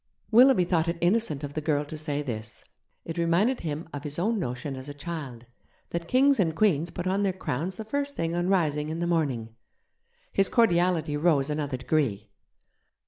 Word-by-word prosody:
Willoughby 240 -4 +6
thought 170 -2 +1
it 170 0 -1
innocent 175 -5 +1
of 145 0 -5
the 155 - -3
girl 145 -1 0
to 150 - -8
say 150 -1 -2
this; 110 -5 -6 0.4
it 165 +1 -4
reminded 180 +10 +2
him 155 0 -4
of 145 -1 -5
his 150 0 -5
own 215 +5 +1
notion 135 -2 -4
as 130 +2 -8
a 145 - -7
child 145 -6 -6 0.5
that 170 0 -3
kings 270 +3 +4
and 165 -5 +1
queens 170 -5 +2
put 175 +1 -5
on 190 +2 +1
their 200 -1 +2
crowns 180 0 -3
the 220 - -6
first 285 +4 -2
thing 165 0 -1
on 175 +1 0
rising 155 -5 +1
in 160 +1 -3
the 175 - 0
morning. 135 -10 -1 0.8
His 195 - +2
cordiality 175 -8 +2
rose 150 -3 +2
another 145 -3 -2
degree. 125 -7 -1
165 Hz, 190 wpm, -27 LUFS, 145-185 Hz, 0.8 s, Willoughby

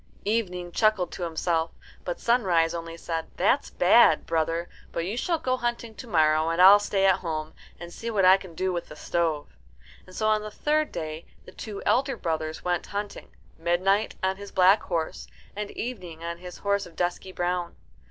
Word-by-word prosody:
Evening 180 -5 -1
chuckled 215 -3 +2
to - - -8
himself, 165 -1 0 0.3
but 175 - -4
Sunrise 180 -9 +2
only 165 -1 -6
said, 165 -1 -4
"That's 60 - +2
bad, 65 - +5
brother; 165 +1 -1 0.2
but 170 - -2
you 200 +5 -3
shall 335 +7 0
go 255 -4 -1
hunting 240 -2 -3
to 240 - -10
morrow, 155 -4 +3
and 165 +1 -1
I'll 195 +3 +9
stay 195 -1 0
at 190 -1 +4
home, 155 -2 -4 0.3
and 175 0 -9
see 230 - -5
what 200 -4 +2
I 185 +1 +8
can 185 -4 -12
do 185 +2 -1
with 175 - -4
the 150 - -11
stove." 160 -3 -2 0.5
And 185 - -13
so 215 - -1
on 215 0 +3
the 215 - -6
third 300 +7 0
day 155 +1 -6 0.2
the - - -12
two 210 -3 -7
elder 265 0 +2
brothers 160 -3 -3
went 175 -1 -1
hunting 205 0 -5 0.3
Midnight 185 +5 +1
on 190 0 +1
his 200 0 -9
black 190 +3 +5
horse, 165 -3 -3 0.3
and 210 0 -4
Evening 180 -9 -6
on 170 0 -5
his 180 -1 -9
horse 200 -1 -1
of 170 - -17
dusky 180 +1 -2
brown. 175 -1 -2
180 Hz, 190 wpm, -26 LUFS, 165-205 Hz, 0.5 s, I'll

